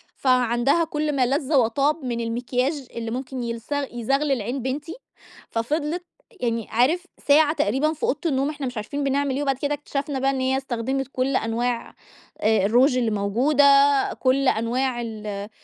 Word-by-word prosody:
فعندها 250 +4 +2
كلّ 300 -2 -2
ما 260 -2 +3
لذ 275 +3 -1
وطاب 275 +4 +2
من 235 -2 -2
المكياج 250 +4 -2
اللي 230 -1 -4
ممكن 255 +1 -4
يلز 230 -1 -5 0.2
يزغلل 270 +2 0
عين 245 +6 -3
بنتي، 285 +6 -4 0.5
ففضلِت 300 +9 -2 0.4
يعني 230 -2 -1
عارف 290 +11 +2 0.2
ساعة 300 +1 +5
تقريبًا 285 +4 +1
في 315 - -13
أوضة 465 - +1
النوم 275 -3 +1
إحنا 290 -3 -4
مش 250 -1 -6
عارفين 280 +7 -3
بنعمل 275 0 0
إيه، 280 - -1
وبعد 275 -2 0
كده 285 +2 -1
اكتشفنا 285 -1 -3
بقى 270 +1 +2
إن 270 -1 -1
هي 260 +1 +1
استخدمت 265 0 -2
كلّ 260 +1 0
أنواع 235 +1 -1 0.5
آآ 215 -2 +3
الروج 250 +5 +4
الموجودة، 235 +5 +2 0.6
كلّ 265 +1 +2
أنواع 240 +2 0
ال 210 -3 -6
260 Hz, 155 wpm, -23 LUFS, 235-285 Hz, 0.6 s, ساعة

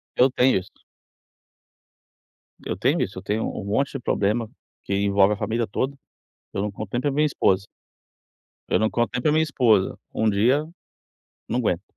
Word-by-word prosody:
Eu 130 +2 +5
tenho 125 -3 +3
isso. 95 - -13 1.9
Eu - - -2
tenho - - +1
isso. - - -3
Eu - - -13
tenho 105 +2 -1
um 100 - -4
monte 125 +8 0
de 135 - -3
problema 110 0 0 0.3
que 100 - -3
envolve 100 0 +3
a 105 - -5
família 115 +2 -1
toda. 135 +7 -2 0.6
Eu 100 - -2
não 105 - -1
conto 100 0 -7
nem 120 - 0
para 145 +2 0
a - - -4
minha 150 +2 +2
esposa. 95 -8 +1 1.0
Eu - - +2
não 110 - +2
conto 120 -1 0
nem 125 - -1
para 150 - +2
a - - +2
minha 155 0 +4
esposa. 120 -10 +2 0.2
Um 110 0 +2
dia 125 +9 +2 0.8
não 120 +3 0
aguento. 90 -5 0
110 Hz, 185 wpm, -24 LUFS, 100-130 Hz, 1.9 s, Eu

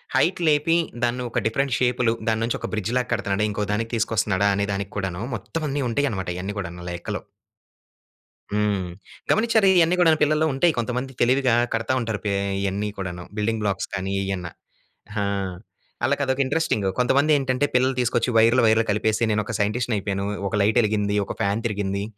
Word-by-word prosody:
Height 170 +8 +2
లేపి 150 +2 +3 0.3
దాన్ని 125 +1 0
ఒక - - 0
డిఫరెంట్ 135 +3 0
షేప్‌లో 125 -2 +2
దాని 110 0 +1
నుంచి 115 - -1
ఒక - - -4
బ్రిడ్జ్ 110 +2 -2
లాగా 125 0 -1
కడుతున్నాడా? 105 -1 0
ఇంకో 105 0 -2
దానికి 115 +2 -2
తీసుకొస్తున్నాడా? 105 -3 +1
అనే 100 0 0
దానికి 100 0 -4
కూడాను, 95 0 -3
మొత్తం 155 +10 -5
అన్ని 140 +1 -1
ఉంటాయి 145 +5 +1
అన్నమాట, 95 -3 -4
ఇయన్నీ 100 +3 -4
కూడా 90 -4 -4 0.2
లెక్కలో. 85 0 -4 1.3
హ్మ్. 100 -4 0 0.4
గమనించారా? 220 -2 +3
ఇయన్నీ 170 +1 +4
కూడాను 160 -3 +5
పిల్లల్లో 155 +1 +2
ఉంటాయి, 165 +5 +3
కొంతమంది 125 +3 -2
తెలివిగా 130 0 +3 0.2
కడతా 115 +2 0
ఉంటారు 115 -3 -2
పే 100 - +1 0.3
ఇయన్నీ 100 +2 -1
కూడాను 90 -2 -5
బిల్డింగ్ 110 +1 0
బ్లాక్స్ 100 -2 -1
కానీ 95 0 -2
ఇయన్న. 95 -3 -3 0.7
ఆ! - - +1 0.8
ఆళ్ళకి 140 +3 +1
అదొక 130 +1 0
ఇంట్రెస్టింగ్. 130 -7 0
కొంతమంది 140 +5 +3
ఏంటంటే 135 0 0
పిల్లల్ని 130 +1 +2
తీసుకొచ్చి 120 0 +1
వైర్లు, 115 +3 +5
వైర్లు 110 0 +4
కలిపేసి 110 +2 +1
నేను 105 0 +1
ఒక 115 - -5
సైంటిస్ట్‌ని 110 +3 0
అయిపోయాను. 100 0 -2 0.2
ఒక 110 - -2
లైట్ 110 +4 +2
ఎలిగింది, 105 -1 0
ఒక - - -5
ఫ్యాన్ 100 +4 0
తిరిగింది, 100 -2 -1
115 Hz, 170 wpm, -23 LUFS, 100-130 Hz, 1.3 s, కూడాను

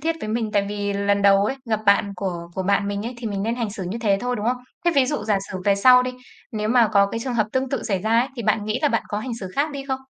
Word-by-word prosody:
thiết 325 +2 -1
với 215 - -5
mình, 220 0 -1
tại 200 -2 +2
vì 205 -1 -2
lần 200 0 +1
đầu 200 0 +5
ấy, 265 +5 -1
gặp 215 - +1
bạn 200 0 +3
của 175 -3 -4
của 190 - -2
bạn 200 +1 +1
mình 205 +2 -3
ấy 250 - -5
thì 235 - -5
mình 200 -2 -2
nên 225 +3 -1
hành 230 -4 -2
xử 200 -2 -6
như 225 +6 -4
thế 205 -4 +2
thôi, 245 0 -1
đúng 210 +2 -3
không? 250 +1 +1 0.3
Thế 345 - +4
ví 270 -2 +4
dụ 280 -6 -2
giả 210 -2 +2
sử 185 - -4
về 200 -1 +4
sau 250 +5 +6
đi, 255 - -2 0.4
nếu 215 -1 -2
mà 235 -2 +4
có 200 -1 +5
cái 225 - -4
trường 250 0 -3
hợp 215 -2 +2
tương 260 0 0
tự 275 - -2
xảy 200 -4 -1
ra 220 +4 +2
ấy, 255 - -1
thì 235 - -4
bạn 215 -1 +1
nghĩ 215 0 -1
là 295 - +4
bạn 230 -4 0
có 205 - -2
hành 235 +1 -4
xử 190 - -5
khác 295 +2 +1
đi 275 -1 -6
không? 265 0 -1
215 Hz, 325 wpm, -22 LUFS, 200-250 Hz, 0.4 s, sau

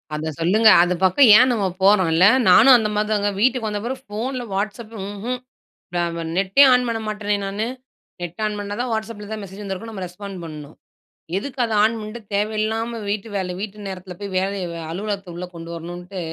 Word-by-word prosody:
அத 155 +1 -3
சொல்லுங்க. 210 +7 +5
அது 175 +1 +1
பக்கம் 190 +7 +6
ஏன் 255 +2 +5
நம்ம 215 -5 0 0.2
போறோன்ல. 185 -4 +5 0.2
நானும் 245 +8 +8
அந்தமாரி 210 -1 -1
தாங்க, 205 -1 +1
வீட்டுக்கு 250 -1 +2
வந்த 210 0 -3
பிறகு 260 +2 -4
ஃபோன்ல 245 +5 -4
Whatsapp 215 +3 -3 0.2
ம்ஹ்ம் 215 +5 -4 0.6
ந - - -1 0.2
ப 170 - -4
நெட்டே 195 +8 +4
ஆன் 250 0 +3
பண்ண 225 -1 -2
மாட்டேனே! 210 -1 -1
நானு. 200 +3 -2 0.6
நெட்ட 175 0 -6
ஆன் 210 -1 -3
பண்ணா 205 0 -4
தான் 250 0 -2
Whatsapp 220 0 -3
ல - - -8
எதாது 220 -1 -5
மெசேஜ் 195 +2 -10
வந்திருக்கும், 200 +3 -6
நம்ம 190 -3 -5
ரெஸ்பாண்ட் 195 +2 -9
பண்ணணும். 150 -2 -9 0.6
எதுக்கு 270 +6 -6
அத 225 - -3
ஆன் 225 +2 +2
பண்ட்டு, 215 +2 -7
தேவையில்லாம 220 +3 -1
வீட்டு 205 +1 -2
வேலை 185 -2 -3
வீட்டு 210 0 -7
நேரத்தில 185 -1 -7
போய் 200 -2 -6
வேலைய 190 -1 -2 0.2
அலுவலகத்த 195 0 -4
உள்ளே 180 +1 -5
கொண்டு 165 0 -8
வரணுன்ட்டு 175 +3 -7
205 Hz, 185 wpm, -21 LUFS, 185-220 Hz, 0.6 s, நானும்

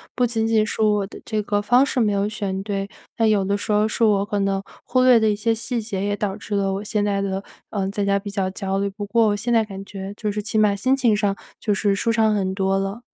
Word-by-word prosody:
不 250 - +2
仅 225 -2 0
仅 220 -1 +3
是 220 - -4
我 210 -2 +3
的 195 - -11
这 215 - -2
个 205 0 0
方 245 +6 +4
式 265 - -1
没 215 -3 +3
有 200 0 +1
选 200 -3 -3
对， 200 -1 -3 0.3
但 225 -1 +2
有 200 -3 +2
的 200 - +1
时 205 +1 -3
候 210 +1 +3
是 225 - -1
我 205 -2 +3
可 205 0 -2
能 195 0 0 0.2
忽 255 - +1
略 250 -2 +7
的 220 -1 +3
一 210 - +1
些 225 +2 +1
细 235 +2 -2
节， 205 -3 -4
也 205 0 0
导 200 -1 -2
致 210 0 -5
了 195 -1 +1
我 200 +2 -3
现 210 -1 -1
在 200 -1 0
的， 195 0 -2 0.3
呃， 195 -2 -2
在 205 0 -2
家 200 0 +2
比 200 +1 -6
较 195 -2 -1
焦 195 0 -2
虑， 200 0 0
不 205 +1 -6
过 225 +2 +3
我 205 - +2
现 235 +4 -1
在 225 -1 +4
感 195 -2 -8
觉 195 -1 -7
就 210 -1 -2
是 210 +1 -3
起 220 +1 -3
码 210 -2 +4
心 260 +6 +2
情 235 -5 +3
上， 205 -1 0 0.2
就 210 - -1
是 200 0 +2
舒 230 +3 0
畅 220 -1 +3
很 190 -2 -1
多 195 0 +1
了。 195 +4 -4
205 Hz, 300 characters per minute, -22 LUFS, 195-220 Hz, 0.3 s, 略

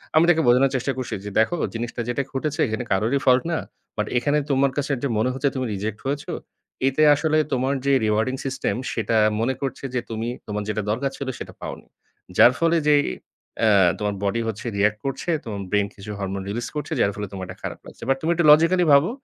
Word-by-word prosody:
আমি 160 +2 +6
তাকে 165 -2 +4
বোঝানোর 130 +2 +5
চেষ্টা 130 +2 0
করছি 130 - -4
যে, - - -3
"দেখো 115 +10 +2 0.2
জিনিসটা 120 +1 -4
যেটা 120 +3 0
ঘটেছে 150 +3 -2
এখানে 110 +2 -3
কারোরই 110 +8 +2
ফল্ট 130 -1 +5
না। 165 - +1 0.4
বাট - - -1
এখানে 145 +4 +2
তোমার 135 0 +3
কাছে 145 0 -1
যে - - +2
মনে 110 +4 +2
হচ্ছে 140 +2 0
তুমি 130 -1 -1
রিজেক্ট 105 +2 -4
হয়েছো, 140 +2 -3 0.6
এতে 135 +3 +2
আসলে 155 +1 +1 0.2
তোমার 130 +2 +1
যে 140 - +3
রিওয়ার্ডিং 110 +5 +1
সিস্টেম 135 -1 -1 0.2
সেটা 115 0 -1 0.2
মনে 120 +4 +1
করছে 135 0 -4
যে - - +2
তুমি 115 0 -3 0.2
তোমার 105 -1 -3
যেটা 105 0 -1
দরকার 135 +5 -1
ছিল 140 - -5
সেটা - - -8
পাওনি। - - -7 0.5
যার 120 - +8
ফলে 165 0 +3
যে 150 - +6 0.6
অ্যা 110 -1 +4 0.3
তোমার 105 -1 -1
বডি 110 +4 0
হচ্ছে 110 0 -5
রিঅ্যাক্ট 105 +1 +2
করছে, 135 +5 -3
তোমার 105 -4 -5
ব্রেইন 100 0 +2
কিছু 100 +1 -8
হরমোন 95 0 -3
রিলিজ 120 +4 -3
করছে 150 +2 -4
যার 100 - +3
ফলে 105 -1 -4
তোমার 95 -1 -5
এটা 90 +1 -9
খারাপ - - -5
লাগছে। - - -12
বাট 135 - +3
তুমি 165 - +1
একটু 170 -1 +1
লজিক্যাল 165 +4 +5
ভাবো, 140 +5 +5
125 Hz, 210 wpm, -23 LUFS, 105-140 Hz, 0.6 s, যার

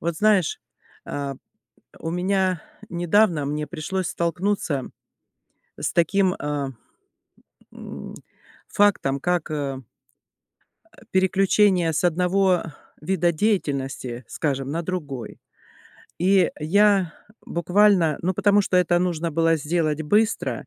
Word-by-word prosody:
Вот 170 -1 -2
знаешь, 210 -4 +2 0.5
э, 140 -1 -4 0.7
у 165 - -4
меня 185 -1 0 0.3
недавно 175 -2 +2
мне 150 +1 -3
пришлось 180 +5 -3
столкнуться 170 -4 -1 0.9
с - - -1
таким, 185 +2 +2
э, 145 -2 -3 1.0
мм, - - -9 0.5
фактом, 140 -10 +2
как, 175 -2 -1
э, 140 -3 -3 1.2
э, - - -16
переключение 190 -2 +3
с 155 - -1
одного 180 +1 +2 0.4
вида 175 +1 +1
деятельности, 140 - -2
скажем, 135 -3 -2
на 165 +3 -2
другой. 150 -9 -5 0.8
И 185 0 +3
я 195 +2 +3 0.3
буквально, 180 -2 +3
ну, 185 +2 0
потому 205 +2 +3
что 185 - 0
это 175 -1 +3
нужно 170 -2 -1
было 165 +1 +2
сделать 155 0 -1
быстро 210 +8 0
170 Hz, 105 wpm, -23 LUFS, 150-190 Hz, 1.2 s, переключение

